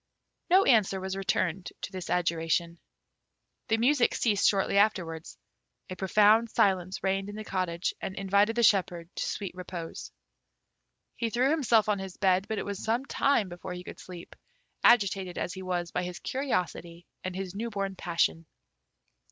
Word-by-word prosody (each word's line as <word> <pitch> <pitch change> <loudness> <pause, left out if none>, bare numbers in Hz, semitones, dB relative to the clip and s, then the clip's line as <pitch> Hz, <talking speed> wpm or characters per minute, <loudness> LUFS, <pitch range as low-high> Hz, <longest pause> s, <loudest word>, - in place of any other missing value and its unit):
No 375 +3 +6
answer 210 - +3
was 190 0 -4
returned 185 -2 -1
to - - -5
this 185 -2 -6
adjuration. 170 -1 0 0.9
The 225 -2 +2
music 245 +2 +3
ceased 210 -4 +3
shortly 200 0 +2
afterwards; 170 -6 0 0.5
a - - -4
profound 210 +5 +4
silence 185 -2 +1
reigned 195 +1 0
in 205 - -7
the 215 - -6
cottage 185 -3 -2
and 190 - -4
invited 200 +3 +2
the 240 - +1
shepherd 180 -5 +2
to - - -2
sweet 200 -3 -4
repose. 175 -2 -7 1.0
He 230 - -2
threw 250 +5 +2
himself 235 -9 +3
on 210 -2 +1
his 190 -1 -7
bed, 190 -1 +2
but 220 - -3
it - - -3
was 200 -1 -5
some 235 +4 0
time 275 -8 +1
before 175 +1 -7
he 180 0 -7
could - - -10
sleep, 175 -2 -11 0.5
agitated 195 -6 +3
as 180 - -3
he 190 - -7
was 175 -2 -3
by 180 - -1
his 180 0 -5
curiosity 175 - -3 0.2
and 185 -1 -4
his 190 -1 -5
new 225 +4 -4
born 195 -2 -3
passion. 165 -2 0
190 Hz, 165 wpm, -28 LUFS, 180-215 Hz, 1.0 s, No